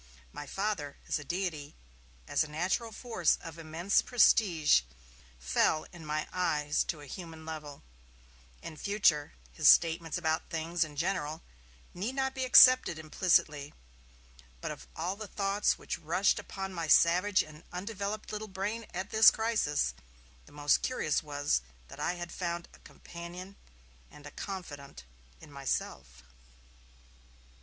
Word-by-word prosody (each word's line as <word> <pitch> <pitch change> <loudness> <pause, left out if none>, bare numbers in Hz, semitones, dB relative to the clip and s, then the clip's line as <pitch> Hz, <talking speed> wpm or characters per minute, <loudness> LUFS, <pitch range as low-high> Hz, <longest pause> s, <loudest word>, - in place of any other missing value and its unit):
My 145 - -7
Father, 195 -6 -3
as - - 0
a - - -8
deity, 160 -3 -4 0.5
as - - +2
a - - -7
natural 180 +9 -1
force 220 -7 0
of 165 0 -10
immense 165 +5 +1
prestige, 185 - +4 0.6
fell 65 - +1
in 165 -3 -11
my 155 0 -2
eyes 150 -5 +1
to 155 -3 -4
a - - -10
human 160 +1 -9
level. 150 -3 -8 0.8
In 155 - -8
future, 170 -8 +2 0.2
his - - +1
statements 165 0 +5
about 160 -2 -1
things 165 +1 -1
in 155 -2 -9
general 160 -1 -2 0.5
need 215 +9 -4
not 265 -1 0
be 260 -1 -2
accepted 255 -7 +7
implicitly. 155 -2 +1 0.8
But - - -4
of - - -10
all 175 +4 -2
the 215 0 -7
thoughts 200 +1 0
which - - -5
rushed - - +1
upon 195 -1 -6
my 165 -2 -3
savage 180 +5 +4
and 155 +1 -14
undeveloped 200 +3 -5
little 215 0 -5
brain 210 +4 -4
at 190 +3 -4
this 220 0 +8
crisis, 215 - 0 0.5
the - - -16
most 145 0 +2
curious 205 - 0
was 145 - 0 0.3
that - - -11
I 175 - 0
had 175 -1 -7
found 170 -1 -4
a - - -17
companion 175 +3 -10 0.5
and 150 - -15
a 145 - -9
confidant 145 - -8 0.4
in - - -14
myself. 65 - -4
170 Hz, 140 wpm, -31 LUFS, 150-195 Hz, 0.8 s, this